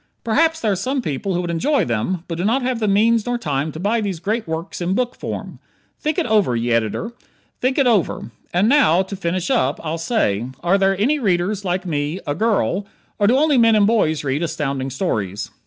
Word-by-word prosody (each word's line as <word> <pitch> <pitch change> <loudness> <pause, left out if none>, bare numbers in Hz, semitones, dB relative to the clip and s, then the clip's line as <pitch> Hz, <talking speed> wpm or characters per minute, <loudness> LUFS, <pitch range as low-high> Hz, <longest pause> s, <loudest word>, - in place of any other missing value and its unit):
Perhaps 320 +8 +2
there 215 - +1
are - - +1
some 260 +9 -1
people 165 - -2
who 175 - 0
would 175 -1 -3
enjoy 275 - +1
them, 125 +10 -2
but 165 -1 -5
do - - -1
not 240 +6 +1
have 250 -2 -1
the 215 - 0
means 220 +3 +3
nor 245 0 0
time 150 -7 -2
to 155 - -8
buy 215 +5 +1
these 195 -5 -3
great 215 +3 -2
works 160 +3 -5
in 180 +2 0
book 250 +1 -1
form. - - -6 0.4
Think 305 -1 -1
it - - +1
over, 210 - +2
ye 120 +1 -1
Ed., 110 -2 +1 0.6
think 255 +1 0
it 275 - +4
over. 210 - +1 0.2
And 180 +4 +2
now, 210 - +4
to 190 +1 -7
finish 180 -1 -2
up, 130 +3 +1
I'll 160 +1 -2
say: 120 - 0 0.2
are 185 +3 +3
there 195 0 +2
any 285 +8 +2
readers 195 -2 0
like 185 0 -2
me 150 +1 -2
a 145 - -1
girl 200 0 0 0.3
or 205 - +3
do 245 +4 +4
only 295 -2 +3
men 230 -1 +5
and 210 -1 +4
boys 180 -9 +2
read 140 +2 -1
Astounding 140 -5 -2
Stories? 110 - -3
190 Hz, 220 wpm, -20 LUFS, 160-230 Hz, 0.6 s, men